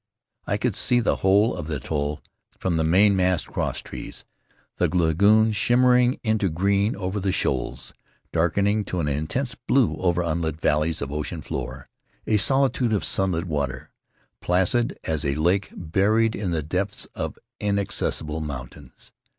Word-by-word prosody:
I - - 0
could - - -1
see 125 - +3
the 120 - +1
whole 100 +5 +3
of 75 - -6
the 80 - -2
atoll 75 +2 -3 0.3
from 90 -3 -1
the 80 - +1
mainmast 90 +1 +3
crosstrees, - - -5 0.5
the - - +2
lagoon, 100 +6 +3
sriimmering 125 +3 +3
into 110 -4 +1
green 100 +6 +1
over 95 +1 -3
the 95 0 0
shoals, - - -2 0.4
darkening 100 +6 +1
to 90 - -3
an 75 - -1
intense 80 - -2
blue 115 - +1
over 90 -1 +1
unlit 80 -1 -2
valleys 75 0 +1
of 70 - -5
ocean 75 +2 -4
floor; - - -6 0.4
a 110 - +2
solitude 135 -1 +3
of 105 - 0
sunlit 95 -3 0
water, 70 -6 -3 0.5
placid 95 +7 +1
as 80 -2 -2
a 70 -2 0
lake 90 +6 +1
buried 105 +7 +1
in 100 -3 -3
the 80 -3 -1
depths 95 +6 -3
of - - -5 0.2
inaccessible 100 -6 -1
mountains. 70 -5 -9
90 Hz, 145 wpm, -24 LUFS, 80-105 Hz, 0.5 s, see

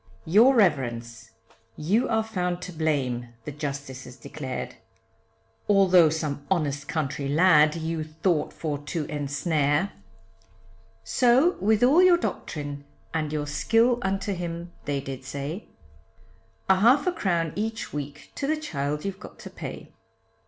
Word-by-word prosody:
Your 225 +11 +6
reverence; 120 - 0 0.5
you 200 +11 +1
are 220 -1 +2
found 180 -5 -2
to 180 - -6
blame 130 -7 -1
the - - -4
Justices 140 -3 -6
declared, 130 +1 -6 0.9
Although 185 -5 +6
some 150 -2 -3
honest 145 -6 -1
country 140 -2 -2
lad 155 -1 +5
you 165 -1 -3
thought 155 0 -1
for 150 -3 -4
to 150 +2 -4
ensnare; 145 +3 0 1.1
So 255 +7 +4
with 215 +2 +2
all 285 +8 +6
your 365 -1 +6
doctrine 145 - -4 0.3
and 155 -2 -1
your 150 -1 -2
skill 225 - +2
unto 195 0 -1
him 170 -1 -5
they 140 -1 -1
did 135 -1 -7
say, 140 +8 -5 1.0
A 190 - +5
half 240 - +5
a 365 - +2
crown 170 - -1
each 220 +2 -3
week 145 0 -6
to 275 - -3
the 310 +1 +1
child 150 - -3
you've 195 -1 -4
got - - -11
to - - -10
pay. - - -8
160 Hz, 135 wpm, -26 LUFS, 145-195 Hz, 1.1 s, Your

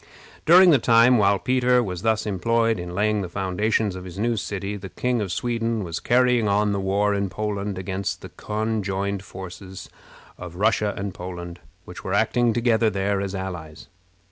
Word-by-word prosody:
During 180 +2 +8
the 145 - +5
time 115 +1 +5
while 100 -1 +4
Peter 125 +1 +2
was 90 -4 -5
thus 110 0 +1
employed 115 +2 +1
in 90 0 -6
laying 105 +1 +1
the 90 - -5
foundations 100 +2 -1
of 90 - -7
his 90 0 -9
new 115 +3 0
city, 100 -1 -4
the 95 -1 -8
King 125 +2 -1
of 100 -4 -3
Sweden 115 0 -1
was 85 -2 -4
carrying 125 -2 +3
on 105 +1 +2
the 100 - -1
war 100 +2 +1
in 100 -1 -1
Poland 100 0 -3
against 95 +1 -3
the - - -9
conjoined 100 -3 -3
forces 95 0 -9 0.5
of 90 -1 -8
Russia 105 +1 +1
and 100 -1 -4
Poland, 90 -1 -7 0.3
which 90 - -10
were 95 - -1
acting 120 +3 +2
together 115 -1 +2
there 100 0 -1
as 100 0 -4
allies. 90 -5 -7
100 Hz, 175 wpm, -23 LUFS, 95-115 Hz, 0.5 s, During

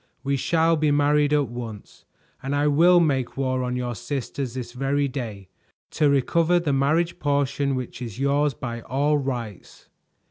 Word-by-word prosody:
We 140 0 0
shall 165 +4 +2
be 155 0 +2
married 145 0 +3
at 145 -2 +2
once, 115 -3 -9 0.4
and 135 +2 -2
I 145 +1 +1
will 170 +5 +5
make 135 -8 0
war 130 -1 0
on 125 0 -2
your 125 -1 -2
sisters 125 +1 -4
this 125 -2 -5
very 140 +2 0
day, 110 -8 -6 0.4
to 150 -2 +2
recover 165 +5 +2
the 155 -5 -1
marriage 155 +5 +1
portion 140 -1 0
which 130 0 -6
is 115 -3 -6
yours 140 0 +1
by 120 -1 -5
all 145 +5 +1
rights." 120 -7 -6
140 Hz, 165 wpm, -24 LUFS, 125-145 Hz, 0.4 s, will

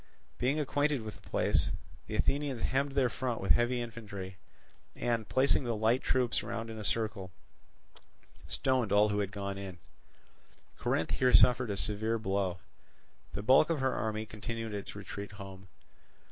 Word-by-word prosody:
Being 135 +5 +1
acquainted 145 -2 +1
with 110 -2 -8
the - - -17
place, - - +2 0.4
the 110 - -4
Athenians 135 +2 0
hemmed 135 +1 +1
their 135 -2 +3
front 125 -1 -2
with 95 - +1
heavy 120 +1 +3
infantry 105 -5 -7 0.6
and, 115 -3 -1
placing 135 +1 +3
the 120 -2 -1
light 110 +4 +2
troops 125 -2 +1
round 115 +1 -4
in 110 - -7
a - - -5
circle, 105 -2 -1 1.2
stoned 130 -5 0
all 105 +1 +5
who 105 0 0
had 100 -1 -1
gone 100 -1 -4
in. 95 -2 -7 1.0
Corinth 80 - 0
here 125 -1 +3
suffered 125 -1 +6
a 100 - -2
severe 105 +5 0
blow. 95 -4 -1 0.8
The 105 - -4
bulk 135 +7 +6
of 165 -3 +1
her 130 0 +1
army 110 -1 -2
continued 110 +1 -5
its 100 -1 -5
retreat 100 0 -7
home. 95 -1 -10
110 Hz, 160 wpm, -32 LUFS, 100-125 Hz, 1.2 s, suffered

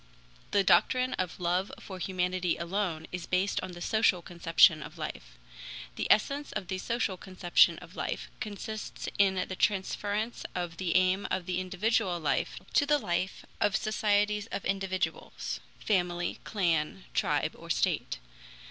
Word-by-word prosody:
The 200 - +3
doctrine 255 +6 +4
of 185 -1 -2
love 180 +2 0
for 190 -2 -8
humanity 180 -1 0
alone 170 -2 -2
is 180 -2 -5
based 185 +2 +1
on 185 -1 -6
the 175 - -9
social 205 -4 +2
conception 170 -1 +4
of - - -9
life. - - -6 0.6
The - - -2
essence 280 +7 +2
of 185 - -4
the 190 -1 -2
social 220 -3 -1
conception 185 -2 +3
of - - -12
life - - -3
consists 215 +1 -5
in 195 -1 +5
the 185 - -4
transference 205 +3 0
of 175 -2 -3
the 180 -2 -1
aim 185 +2 +3
of 180 - -1
the 180 0 -1
individual 185 -1 0
life 160 - 0 0.2
to 285 - +4
the 295 0 +5
life 185 -6 -2
of 205 - +2
societies 210 -1 +1
of 200 - -5
individuals: 195 -1 -2 0.2
family, 175 -4 0
clan, 165 - 0
tribe, - - +1
or - - -12
state. - - +1
185 Hz, 150 wpm, -30 LUFS, 175-205 Hz, 0.6 s, in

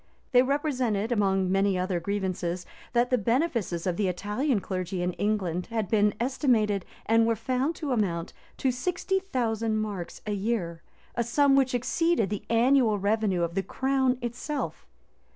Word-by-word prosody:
They 250 -2 +7
represented, 255 -6 0
among 195 -4 +2
many 195 0 +2
other 180 -1 -1
grievances, 185 -1 -2 0.3
that 240 +1 +2
the 250 - +3
benefices 230 - 0
of 180 -2 -1
the 205 - +1
Italian 210 - 0
clergy 185 -1 -3
in 180 0 -1
England 185 -4 -1
had 220 -5 -2
been 210 -2 +3
estimated, 230 - +1 0.2
and 225 0 +4
were 230 - +2
found 255 +7 -1
to 300 -4 -4
amount 180 -8 -1 0.2
to 265 - +1
sixty 360 +9 -1
thousand 230 - -1
marks[*] 205 -5 -4
a 210 - -1
year, 195 -5 -2 0.3
a 235 - 0
sum 275 +4 +3
which 260 -2 +3
exceeded 260 - +1
the 205 - -4
annual 235 -1 +4
revenue 200 -3 +1
of 170 0 -2
the 195 - 0
crown 265 +3 +1
itself. 245 +5 -4
220 Hz, 155 wpm, -27 LUFS, 195-255 Hz, 0.3 s, They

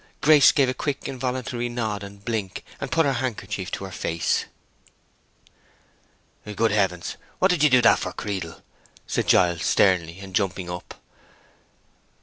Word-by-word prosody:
Grace 150 -1 +7
gave 140 -3 +3
a 130 - 0
quick, 140 +1 -3
involuntary 125 -2 -3
nod 110 -4 -3
and 100 0 -11
blink, 105 -5 -3 0.2
and 135 - -5
put 165 -1 +3
her 140 - +2
handkerchief 115 -7 -4
to - - -5
her 95 - -8
face. 85 -1 -1 2.1
"Good 115 0 +2
heavens! 95 -4 -1 0.2
what 190 +1 +3
did 175 -4 0
you 150 - +6
do 130 -2 +5
that - - +6
for, - - -4
Creedle?" 95 -5 -5 0.4
said - - -2
Giles, 85 -2 +3
sternly, 90 -3 +2
and 95 -1 -10
jumping 95 -2 -1
up. 90 0 -8
105 Hz, 145 wpm, -24 LUFS, 95-130 Hz, 2.1 s, Grace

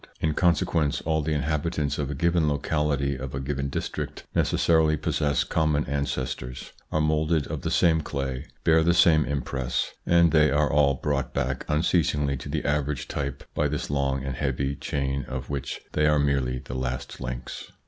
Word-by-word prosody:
In 80 -1 +1
consequence 80 -3 +2
all 80 0 0
the 75 +1 -1
inhabitants 75 0 -1
of 70 -2 -1
a 75 - -3
given 85 +1 +2
locality, 70 -1 0
of 65 0 -6
a - - -2
given 70 0 -2
district, - - -4
necessarily 80 -2 +3
possess 75 0 0
common 75 -2 +1
ancestors, 65 -3 -3 0.2
are 80 - +1
moulded 75 0 +1
of - - -5
the - - -2
same 80 -2 +3
clay, 70 -2 -4 0.2
bear 80 0 +5
the 85 +1 +3
same 80 -4 +5
impress, 70 -3 -2 0.2
and 85 -1 +5
they 75 -1 +5
are 75 0 +2
all 70 -1 +4
brought 70 -1 -2
back 65 -1 -1
unceasingly 75 -2 +1
to - - -8
the - - -2
average 75 -1 -1
type 70 -2 -4
by 75 - +1
this 70 0 -3
long 70 -1 0
and 65 -1 -4
heavy 70 0 -1
chain, 70 0 -2
of 65 +1 -6
which 70 -1 -4
they 75 0 +2
are 75 0 +4
merely 70 -3 +1
the 65 -1 -8
last 65 0 -4
links. 65 -1 -6
70 Hz, 175 wpm, -26 LUFS, 70-75 Hz, 0.2 s, bear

